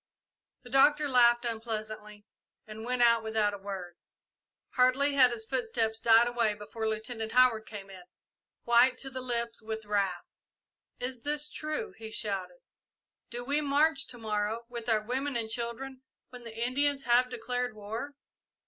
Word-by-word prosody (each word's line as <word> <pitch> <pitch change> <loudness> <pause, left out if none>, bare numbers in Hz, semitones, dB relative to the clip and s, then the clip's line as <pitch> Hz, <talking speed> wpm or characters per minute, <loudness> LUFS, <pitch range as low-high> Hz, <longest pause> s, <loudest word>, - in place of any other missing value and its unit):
The 245 - -13
Doctor 295 +3 +5
laughed 240 -2 +5
unpleasantly, 215 -2 -5 0.4
and 215 0 -9
went 250 +1 +1
out 230 -1 +5
without 220 -1 +1
another 200 -1 -9
word. 185 -3 -6 0.7
Hardly 260 +3 +3
had 260 -3 +6
his 230 -2 -3
footsteps 225 -3 -1
died 230 +1 +6
away 235 -3 +1
before 220 +2 -5
Lieutenant 220 0 -4
Howard 245 -3 +4
came 195 -2 -9
in, 185 -1 -11 0.6
white 240 +2 +5
to 270 - -6
the 260 0 -5
lips 235 -2 -2
with 220 0 -5
wrath. 195 -4 -1 0.7
"Is 250 -1 -3
this 295 +2 -1
true?" 310 +8 -4
he 220 -1 -7
shouted. 190 -5 -4 0.7
"Do 240 +1 -6
we 290 +3 +1
march 290 0 +2
to 245 - -9
morrow, 215 +1 -2
with 235 -1 -6
our 220 -1 +3
women 265 +4 -2
and 225 -2 -2
children, 255 +3 -5 0.3
when 245 -1 -11
the 225 -1 -8
Indians 280 +2 0
have 245 +1 +4
declared 245 -1 -3
war?" 225 +7 -6
235 Hz, 155 wpm, -30 LUFS, 220-255 Hz, 0.7 s, had